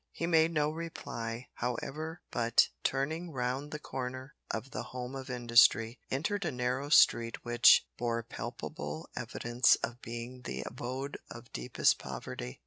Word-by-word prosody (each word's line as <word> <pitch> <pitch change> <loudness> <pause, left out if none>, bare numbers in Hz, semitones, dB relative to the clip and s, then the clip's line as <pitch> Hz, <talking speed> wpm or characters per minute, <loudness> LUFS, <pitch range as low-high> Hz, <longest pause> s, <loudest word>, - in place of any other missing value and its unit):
He 165 - -3
made 165 -1 +4
no 150 -2 +1
reply, 125 -7 -5
however, 155 +7 -3
but, 115 -1 +4
turning 155 +6 -1
round 130 0 -2
the 150 - -4
corner 130 -1 -5 0.2
of 110 +5 -4
the - - -3 0.2
Home 125 +1 -4
of 135 0 -6
Industry, 120 -1 +4
entered 195 +9 -1
a 160 - -1
narrow 125 +3 -1
street 115 -6 +5
which 120 0 +7
bore 115 -1 0
palpable 130 +8 -6
evidence 120 0 +3
of 120 +1 -4
being 120 +2 -6
the 65 - -4
abode 130 +3 -5
of - - -11
deepest 60 0 +2
poverty. 60 +1 -6
125 Hz, 140 wpm, -32 LUFS, 120-150 Hz, 0.2 s, which